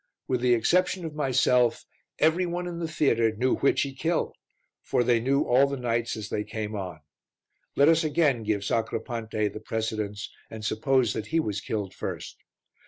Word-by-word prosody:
With 125 Hz, -2 st, 0 dB
the 125 Hz, -1 st, +4 dB
exception 180 Hz, +9 st, +1 dB
of 160 Hz, -, -5 dB
myself, 125 Hz, -4 st, +2 dB, 0.3 s
every 170 Hz, +3 st, +3 dB
one 175 Hz, +1 st, -3 dB
in 175 Hz, -1 st, -5 dB
the 165 Hz, -, -2 dB
theatre 115 Hz, -8 st, +2 dB
knew 130 Hz, +4 st, +1 dB
which 140 Hz, -, +2 dB
he 140 Hz, -, -5 dB
killed, 160 Hz, +5 st, -1 dB, 0.5 s
for 125 Hz, -, +1 dB
they 120 Hz, -1 st, +3 dB
knew 135 Hz, +4 st, +2 dB
all 130 Hz, +3 st, +4 dB
the 140 Hz, 0 st, -3 dB
knights 115 Hz, -2 st, -1 dB
as 105 Hz, -2 st, -6 dB
they 105 Hz, -, -1 dB
came 110 Hz, 0 st, -5 dB
on. 90 Hz, -6 st, -5 dB, 0.7 s
Let 140 Hz, -, +5 dB
us 165 Hz, +1 st, +5 dB
again 150 Hz, -5 st, +2 dB
give 105 Hz, -2 st, -1 dB
Sacripante 110 Hz, -1 st, -1 dB
the 105 Hz, -, -8 dB
precedence 110 Hz, -2 st, -3 dB, 0.2 s
and 110 Hz, -1 st, -7 dB
suppose 125 Hz, +1 st, +2 dB
that 110 Hz, -1 st, -4 dB
he 165 Hz, -, +1 dB
was 105 Hz, -8 st, -2 dB
killed 105 Hz, -4 st, -3 dB
first. -, -, -6 dB
120 Hz, 175 wpm, -27 LUFS, 110-145 Hz, 0.7 s, Let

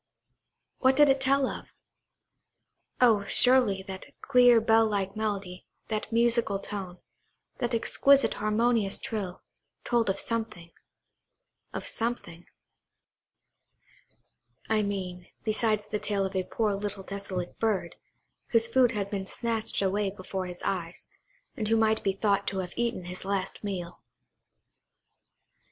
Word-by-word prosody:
What 260 Hz, 0 st, +4 dB
did 295 Hz, 0 st, +6 dB
it 270 Hz, 0 st, +3 dB
tell 270 Hz, 0 st, +3 dB
of? -, -, -8 dB, 1.2 s
Oh, 225 Hz, -5 st, +5 dB
surely, 245 Hz, -5 st, +4 dB
that 190 Hz, -1 st, -8 dB
clear 245 Hz, -3 st, +5 dB
bell 225 Hz, 0 st, +4 dB
like 200 Hz, -1 st, -2 dB
melody, 200 Hz, -4 st, -4 dB, 0.2 s
that 215 Hz, 0 st, -3 dB
musical 230 Hz, -3 st, +2 dB
tone, 195 Hz, -2 st, -6 dB, 0.6 s
that 240 Hz, -1 st, 0 dB
exquisite 270 Hz, +1 st, +3 dB
harmonious 215 Hz, -1 st, +1 dB
trill, 200 Hz, -5 st, -5 dB, 0.4 s
told 235 Hz, -4 st, +1 dB
of 195 Hz, -, 0 dB
something–of 225 Hz, -, -8 dB
something, 225 Hz, -7 st, -3 dB, 2.2 s
I 220 Hz, -1 st, +2 dB
mean, 185 Hz, -3 st, -4 dB, 0.2 s
besides 215 Hz, -1 st, 0 dB
the 210 Hz, -, -1 dB
tale 200 Hz, -2 st, -1 dB
of 190 Hz, -, -5 dB
a 185 Hz, -1 st, 0 dB
poor 215 Hz, 0 st, 0 dB
little 200 Hz, -1 st, -4 dB
desolate 190 Hz, -2 st, -5 dB
bird, 220 Hz, -4 st, -1 dB, 0.5 s
whose 230 Hz, -1 st, +3 dB
food 245 Hz, 0 st, +3 dB
had 200 Hz, -2 st, -3 dB
been 195 Hz, -2 st, -3 dB
snatched 225 Hz, -2 st, -1 dB
away 200 Hz, +1 st, +1 dB
before 190 Hz, -1 st, -5 dB
his 180 Hz, 0 st, -9 dB
eyes, 175 Hz, -3 st, -4 dB, 0.5 s
and 215 Hz, -, -3 dB
who 225 Hz, -, +3 dB
might 220 Hz, 0 st, +2 dB
be 195 Hz, -, 0 dB
thought 200 Hz, 0 st, 0 dB
to 195 Hz, -, -2 dB
have 175 Hz, -, -13 dB
eaten 235 Hz, -5 st, -1 dB
his 180 Hz, +1 st, -7 dB
last 195 Hz, 0 st, -3 dB
meal. 180 Hz, -4 st, -5 dB
210 Hz, 125 wpm, -28 LUFS, 190-230 Hz, 2.2 s, did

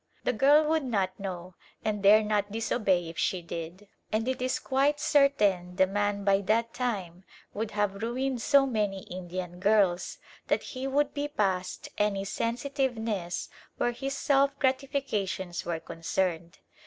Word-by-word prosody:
The -, -, +1 dB
girl 290 Hz, +7 st, +5 dB
would 315 Hz, -1 st, +2 dB
not 195 Hz, -7 st, -1 dB
know, 185 Hz, -2 st, -6 dB, 0.3 s
and 210 Hz, -2 st, -1 dB
dare 210 Hz, +2 st, +7 dB
not 210 Hz, -1 st, 0 dB
disobey 200 Hz, -5 st, +1 dB
if 165 Hz, 0 st, -7 dB
she 180 Hz, -2 st, 0 dB
did; 170 Hz, +4 st, -7 dB, 0.2 s
and 220 Hz, +2 st, 0 dB
it 260 Hz, -1 st, -1 dB
is 255 Hz, 0 st, 0 dB
quite 280 Hz, +2 st, +1 dB
certain 205 Hz, -13 st, +2 dB
the 190 Hz, 0 st, +5 dB
man 205 Hz, +1 st, -1 dB
by 195 Hz, 0 st, +3 dB
that 230 Hz, +4 st, +1 dB
time 195 Hz, -8 st, -3 dB, 0.3 s
would 220 Hz, +1 st, -3 dB
have 200 Hz, -1 st, 0 dB
ruined 250 Hz, +2 st, -1 dB
so 280 Hz, +2 st, +5 dB
many 210 Hz, -6 st, -1 dB
Indian 180 Hz, 0 st, -6 dB
girls 195 Hz, -3 st, +2 dB, 0.3 s
that -, -, +1 dB
he 260 Hz, 0 st, -5 dB
would 280 Hz, +1 st, +1 dB
be 290 Hz, 0 st, -2 dB
past 190 Hz, -9 st, -2 dB
any 200 Hz, -2 st, +1 dB
sensitiveness 230 Hz, -, -2 dB, 0.3 s
where 240 Hz, -, +1 dB
his 275 Hz, +3 st, -4 dB
self 280 Hz, 0 st, +2 dB
gratifications 260 Hz, -10 st, -1 dB
were 170 Hz, -1 st, -2 dB
concerned. 170 Hz, +1 st, -2 dB
210 Hz, 150 wpm, -28 LUFS, 185-260 Hz, 0.3 s, dare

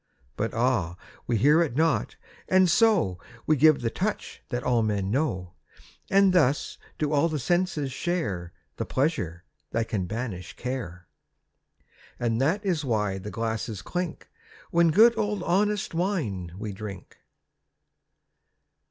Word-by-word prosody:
But 115 Hz, -, -2 dB
ah, 115 Hz, -8 st, +1 dB, 0.3 s
we 120 Hz, -, +1 dB
hear 150 Hz, +9 st, +5 dB
it 150 Hz, -8 st, -1 dB
not, 160 Hz, +2 st, +1 dB, 0.3 s
and 185 Hz, 0 st, +5 dB
so 175 Hz, -, +3 dB, 0.3 s
We 155 Hz, -, +4 dB
give 155 Hz, 0 st, +5 dB
the 115 Hz, -1 st, -1 dB
touch 210 Hz, +8 st, -3 dB
that 120 Hz, -2 st, -3 dB
all 120 Hz, -2 st, +2 dB
men 100 Hz, -3 st, -1 dB
know. 95 Hz, -, -1 dB, 0.6 s
And 195 Hz, -1 st, +5 dB
thus 145 Hz, -5 st, +2 dB, 0.2 s
do 150 Hz, -1 st, -1 dB
all 150 Hz, +3 st, +3 dB
the 155 Hz, -, -2 dB
senses 175 Hz, -1 st, 0 dB
share 110 Hz, -, -2 dB, 0.3 s
The -, -, -2 dB
pleasure 110 Hz, -, -1 dB, 0.3 s
that 115 Hz, +1 st, -1 dB
can 95 Hz, -4 st, -1 dB
banish 105 Hz, -4 st, -5 dB
care. 105 Hz, -9 st, -5 dB, 1.1 s
And 115 Hz, 0 st, 0 dB
that 185 Hz, +10 st, +1 dB
is 170 Hz, -5 st, 0 dB
why 105 Hz, -6 st, 0 dB
the 100 Hz, +2 st, -7 dB
glasses 110 Hz, -2 st, -3 dB
clink 180 Hz, -2 st, -4 dB, 0.4 s
When 170 Hz, 0 st, +4 dB
good 225 Hz, +8 st, +6 dB
old 210 Hz, -3 st, -1 dB
honest 205 Hz, +2 st, +1 dB
wine 155 Hz, -, -2 dB
we 105 Hz, 0 st, -5 dB
drink. 100 Hz, -2 st, -9 dB
130 Hz, 135 wpm, -26 LUFS, 105-170 Hz, 1.1 s, good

